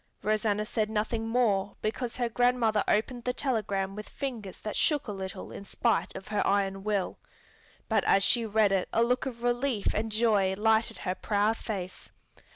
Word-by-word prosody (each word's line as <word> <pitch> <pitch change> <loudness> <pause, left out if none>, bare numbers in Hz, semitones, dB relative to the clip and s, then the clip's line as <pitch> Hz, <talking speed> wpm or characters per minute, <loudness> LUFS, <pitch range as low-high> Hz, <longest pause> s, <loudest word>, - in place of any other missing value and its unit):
Rosanna 210 0 +1
said 215 -1 -1
nothing 220 +1 -1
more 215 -4 +1
because 230 +2 -3
her 245 -1 0
grandmother 235 -2 +2
opened 240 +3 0
the 250 - -1
telegram 205 -8 -1
with 210 0 -7
fingers 230 -9 -5
that 215 - -4
shook 295 -5 +1
a - - -3
little 190 -2 -6
in - - -8
spite 200 -3 0
of 190 +1 -8
her 210 -1 +1
iron 195 -1 +1
will. 200 -2 -1 0.7
But - - +2
as 195 - +4
she 235 +5 +3
read 215 -2 +3
it 190 -2 +1
a 230 - +3
look 250 +2 +1
of 235 -2 -7
relief 245 -2 0
and 220 +1 -1
joy 210 -4 +2
lighted 220 +2 +2
her 185 - -2
proud 210 +3 +1
face. 185 -5 -6
215 Hz, 175 wpm, -29 LUFS, 200-235 Hz, 0.7 s, as